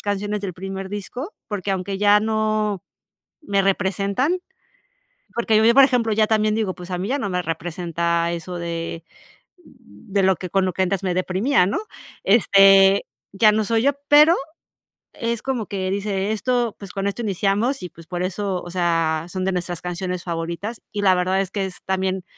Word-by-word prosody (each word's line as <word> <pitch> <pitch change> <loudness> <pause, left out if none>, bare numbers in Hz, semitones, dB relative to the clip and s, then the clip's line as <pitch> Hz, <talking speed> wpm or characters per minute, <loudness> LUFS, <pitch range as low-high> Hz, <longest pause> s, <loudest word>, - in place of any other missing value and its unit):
canciones 205 +1 -2
del 190 - -3
primer 195 +2 -6
disco, 245 - -6 0.2
porque 200 -2 -3
aunque 195 +1 -2
ya 205 +1 +5
no 215 -2 0 0.6
me 200 -6 +1
representan, 200 - 0 1.0
porque 230 -2 +1
yo, 225 +2 +5
por 275 0 +8
ejemplo, 240 -4 +1
ya 215 0 +3
también 215 -1 +2
digo, 210 -4 -1
pues 180 0 -10
a 180 - -1
mí 185 +2 -3
ya 275 +5 0
no 205 -7 -3
me 180 0 -1
representa 170 0 -2
eso 175 +1 -5
de 165 -1 -4 0.6
de 190 - -5
lo 190 -1 +4
que 180 - -6
con 195 +1 +2
lo 185 - 0
que 190 - -2
antes 190 0 -1
me 185 -2 0
deprimía, 185 +6 +2
¿no? 200 - -1 0.4
Este, 195 -2 +6 0.3
ya 215 +2 +5
no 215 +1 +1
soy 225 +1 +1
yo, 280 - +4 0.2
pero 300 +4 +7 0.8
es 235 -3 -3
como 255 -5 -2
que 190 -2 -3
dice: 200 0 -1
"Esto 240 +1 0
pues 200 -2 -9
con 195 0 -3
esto 200 +4 -2
iniciamos 210 +6 0
y, 180 - -6
pues 165 0 -15
por 175 -1 -4
eso 190 0 -2
o 175 - -9
sea, 165 -3 0
son 185 +1 -3
de 190 - 0
nuestras 175 -1 -4
canciones 180 0 -4
favoritas". 170 +6 -4
Y 205 - -3
la 190 -2 +5
verdad 185 +1 +1
es 185 - -6
que 195 -1 -2
es 185 - -10
también 190 -1 -1
195 Hz, 185 wpm, -22 LUFS, 180-215 Hz, 1.0 s, por